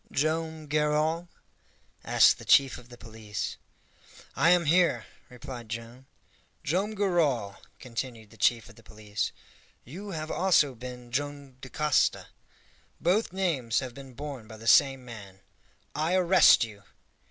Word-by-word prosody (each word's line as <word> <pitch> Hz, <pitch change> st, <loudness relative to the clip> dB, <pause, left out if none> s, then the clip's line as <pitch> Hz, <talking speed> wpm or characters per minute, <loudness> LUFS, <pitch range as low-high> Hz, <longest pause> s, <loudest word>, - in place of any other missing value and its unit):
"Joam 160 Hz, +1 st, -1 dB
Garral?" 150 Hz, +3 st, 0 dB, 0.7 s
asked -, -, +5 dB
the -, -, -10 dB
chief 135 Hz, -3 st, +4 dB
of 120 Hz, 0 st, -17 dB
the 120 Hz, -, -12 dB
police. 110 Hz, -3 st, -6 dB, 0.8 s
"I 165 Hz, -, +4 dB
am 175 Hz, -1 st, +4 dB
here," 165 Hz, -7 st, +3 dB, 0.2 s
replied 125 Hz, -2 st, -9 dB
Joam. 115 Hz, +3 st, -8 dB, 0.6 s
"Joam 195 Hz, +8 st, -1 dB
Garral," 155 Hz, -, 0 dB, 0.2 s
continued 115 Hz, -3 st, -6 dB
the -, -, -16 dB
chief 115 Hz, -1 st, +2 dB
of 115 Hz, -, -16 dB
the -, -, -15 dB
police, 105 Hz, -1 st, -4 dB, 0.5 s
"you 190 Hz, -, -9 dB
have 155 Hz, -3 st, -5 dB
also 175 Hz, -7 st, +3 dB
been 125 Hz, 0 st, -10 dB
Joam 140 Hz, 0 st, -4 dB
Dacosta; 145 Hz, +2 st, 0 dB, 0.7 s
both 185 Hz, +7 st, +1 dB
names 160 Hz, -12 st, -1 dB
have 130 Hz, -3 st, -2 dB
been 135 Hz, -2 st, -12 dB
borne 140 Hz, -5 st, -7 dB
by 110 Hz, -1 st, -11 dB
the 110 Hz, -, -12 dB
same 130 Hz, +3 st, +4 dB
man 100 Hz, -5 st, -11 dB, 0.5 s
I 160 Hz, +4 st, 0 dB
arrest 185 Hz, -6 st, +6 dB
you!" 105 Hz, -3 st, -8 dB
135 Hz, 135 wpm, -28 LUFS, 115-160 Hz, 0.8 s, arrest